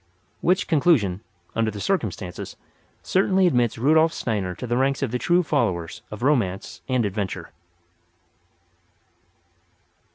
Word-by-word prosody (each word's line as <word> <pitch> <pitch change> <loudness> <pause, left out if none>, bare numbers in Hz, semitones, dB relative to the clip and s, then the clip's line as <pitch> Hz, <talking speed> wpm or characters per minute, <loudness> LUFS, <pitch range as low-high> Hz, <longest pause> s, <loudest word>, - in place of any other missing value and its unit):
Which 185 +3 +2
conclusion, 135 - +3 0.3
under 115 -1 +1
the 105 -1 -6
circumstances, 100 - -3 0.5
certainly 190 0 +3
admits 120 -9 +2
Rudolf 155 +6 +4
Steiner 100 - -2
to - - -6
the 120 0 -1
ranks 135 +2 +1
of 130 - -1
the 125 - -1
true 175 +5 +3
followers 90 - -1
of 105 +2 -7
Romance 115 -10 0
and 125 -3 +2
Adventure. 100 -1 -4
120 Hz, 120 wpm, -24 LUFS, 100-160 Hz, 0.5 s, Rudolf